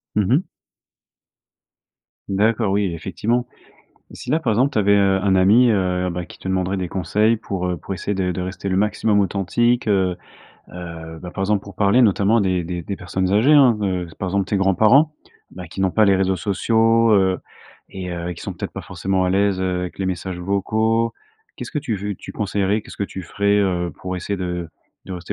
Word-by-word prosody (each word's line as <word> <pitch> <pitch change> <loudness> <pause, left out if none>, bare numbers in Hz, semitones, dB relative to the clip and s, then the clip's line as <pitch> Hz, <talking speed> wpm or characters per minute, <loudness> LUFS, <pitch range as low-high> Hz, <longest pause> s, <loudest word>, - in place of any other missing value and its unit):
Mmh 105 -2 +2
mh. 160 - +3 1.9
D'accord, 105 +1 +1
oui, 100 0 +1
effectivement. 115 +9 -2 0.7
Si 125 - -8
là, 155 - +3
par 125 -9 0
exemple, 130 +6 +2
tu - - 0
avais, 100 -1 +3
heu, 100 -1 +3
un 95 -1 +2
ami, 105 +7 +5
heu, 90 -2 0
bah 90 0 -4
qui - - -14
te - - -12
demanderait 95 0 0
des 90 -2 -3
conseils 105 +6 +1
pour, 95 -4 -4
heu, 90 -1 -1
pour 85 - -7
essayer 95 +2 -3
de 95 -1 -1
de 90 - -3
rester 95 +2 -4
le 95 - 0
maximum 105 +1 +1
authentique, 110 +5 +1
heu. 95 -3 +2 0.5
Heu, 85 -2 -8
bah 90 - -7
par 95 - -7
exemple, 100 0 +1
pour 100 -2 -11
parler 105 +5 +3
notamment 105 +1 +3
des 95 -2 0
des 85 0 -5
des 100 +3 -5
personnes 95 +1 -2
âgées 115 +9 +4
hein, 130 -6 +6
heu, 90 -3 -1
par 95 - -3
exemple 100 +1 0
tes 100 +1 -1
grands 95 -1 +2
parents, 140 - +4 0.4
bah 90 -2 -9
qui 90 - -7
n'ont 95 -1 +2
pas 110 +4 +3
les 100 -2 +4
réseaux 95 0 +1
sociaux, 115 +5 +2
heu 95 -2 +2 0.5
et 95 -1 -6
heu, 85 0 -4
qui - - -11
sont - - -4
peut - - -5
être - - -19
pas - - -7
forcément 95 -1 -1
à 90 - +1
l'aise, 100 0 +2
heu, 90 -1 -1
avec 90 +1 -6
les 95 - -2
messages 95 0 -3
vocaux. 110 +5 0 0.4
Qu'est - - -6
ce - - -9
que 150 - -1
tu 125 -8 -3
veux 105 +1 -4
tu - - -11
conseillerais? 100 0 -1
Qu'est - - -14
ce - - -11
que 100 - 0
tu 95 -1 -7
ferais, 100 +4 +1
heu, 90 -3 0
pour 90 0 -3
essayer 100 +3 -3
de 90 -2 -4 0.4
de 95 - -6
rester 90 -1 -6
95 Hz, 220 wpm, -21 LUFS, 90-105 Hz, 1.9 s, hein